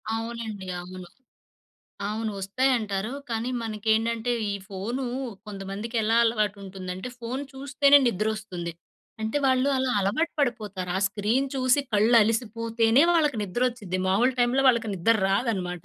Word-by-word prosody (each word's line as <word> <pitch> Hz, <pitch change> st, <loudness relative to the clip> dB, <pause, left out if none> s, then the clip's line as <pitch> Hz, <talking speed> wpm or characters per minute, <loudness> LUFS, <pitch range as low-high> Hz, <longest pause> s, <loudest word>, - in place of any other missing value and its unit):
అవునండి. 225 Hz, -4 st, -5 dB
అవును. 180 Hz, 0 st, -9 dB, 1.0 s
అవును 220 Hz, 0 st, -2 dB
వస్తాయంటారు. 215 Hz, 0 st, 0 dB, 0.2 s
కానీ 230 Hz, +2 st, -1 dB
మనకేంటంటే 225 Hz, +2 st, 0 dB, 0.2 s
ఈ -, -, -2 dB
ఫోను 225 Hz, +7 st, -4 dB, 0.4 s
కొంతమందికెలా 210 Hz, +3 st, -2 dB
అలవాటుంటుందంటే 200 Hz, -2 st, -2 dB
ఫోను 255 Hz, +4 st, -4 dB
చూస్తేనే 280 Hz, +1 st, +4 dB
నిద్రొస్తుంది. 215 Hz, -5 st, -3 dB, 0.5 s
అంటే 220 Hz, +6 st, -1 dB
వాళ్ళు 260 Hz, +1 st, +3 dB
అలా 260 Hz, -1 st, 0 dB
అలవాటు 245 Hz, -, 0 dB
పడిపోతారు. 210 Hz, -8 st, -2 dB
ఆ -, -, +1 dB
స్క్రీన్ 220 Hz, +7 st, 0 dB
చూసి 255 Hz, +1 st, +3 dB
కళ్ళలిసిపోతేనే 230 Hz, +2 st, +3 dB
వాళ్ళకి 300 Hz, -7 st, +2 dB
నిద్రొచ్చుద్ది. 205 Hz, -2 st, -2 dB
మామూలు 235 Hz, +7 st, +3 dB
టైమ్‌లో 245 Hz, +3 st, +3 dB
వాళ్ళకి 235 Hz, -3 st, +2 dB
నిద్దర 220 Hz, +6 st, +3 dB
రాదనమాట. 190 Hz, -6 st, -1 dB
225 Hz, 110 wpm, -26 LUFS, 200-245 Hz, 1.0 s, చూస్తేనే